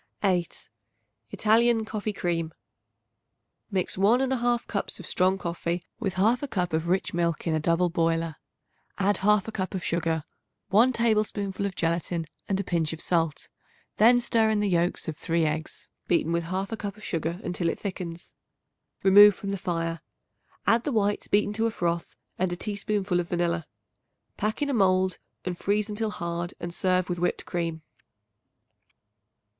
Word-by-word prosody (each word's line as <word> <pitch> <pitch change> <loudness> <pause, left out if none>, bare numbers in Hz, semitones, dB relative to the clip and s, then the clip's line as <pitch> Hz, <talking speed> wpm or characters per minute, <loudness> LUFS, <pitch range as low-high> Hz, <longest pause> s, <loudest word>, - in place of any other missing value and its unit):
8. 180 -4 0 0.6
Italian 225 +1 +3
Coffee 215 0 -3
Cream. 170 -4 -2 1.1
Mix 190 -2 -1
1 215 +6 +5
1/2 245 -3 +1
cups 200 - -3
of - - -8
strong 185 +1 +2
coffee 170 0 -3
with 195 -5 -2
1/2 235 +8 +2
cup 180 -6 -1
of 160 +1 0
rich 185 +2 0
milk 170 -2 0
in 165 - +1
a 155 - +1
double 170 +3 +2
boiler; 165 -1 0 0.6
add 200 0 +2
1/2 210 +1 +2
cup 190 0 -3
of 185 - -3
sugar, 165 -2 0 0.5
1 230 +6 +5
tablespoonful 210 -4 0
of 190 - -7
gelatin 170 0 -1 0.2
and 195 -1 +1
a - - 0
pinch 165 -4 0
of 160 - -7
salt. 165 -3 0 0.5
Then 240 +3 +6
stir 230 -2 +2
in 215 -1 +2
the 205 - +1
yolks 175 0 +1
of 155 -2 -4
3 165 0 0
eggs 155 +1 -3 0.2
beaten 165 -1 +2
with 170 0 0
1/2 190 +5 -2
cup 205 0 -5
of 215 - -14
sugar 165 +1 -2
until 175 -1 -1
it - - -2
thickens. 175 -4 -6 0.7
Remove 205 +1 +8
from 200 +1 -5
the - - -1
fire; 165 -1 -2 0.6
add 230 +1 +4
the 290 - -1
whites 205 -3 0
beaten 205 0 +2
to 225 +2 +1
a - - -1
froth 170 -4 -2 0.2
and 185 -1 +1
a - - -1
teaspoonful 200 -2 -1
of 175 - -3
vanilla. 170 -2 0 0.7
Pack 215 +7 -1
in 285 - -1
a - - -1
mold 185 -4 +2 0.3
and 180 -1 -3
freeze 210 +1 0
until 215 +1 -1
hard 170 -3 -4
and 175 0 -5
serve 185 0 +1
with 175 -1 -3
whipped 180 - -1
cream. 165 -2 -3
185 Hz, 165 wpm, -27 LUFS, 170-210 Hz, 1.1 s, Remove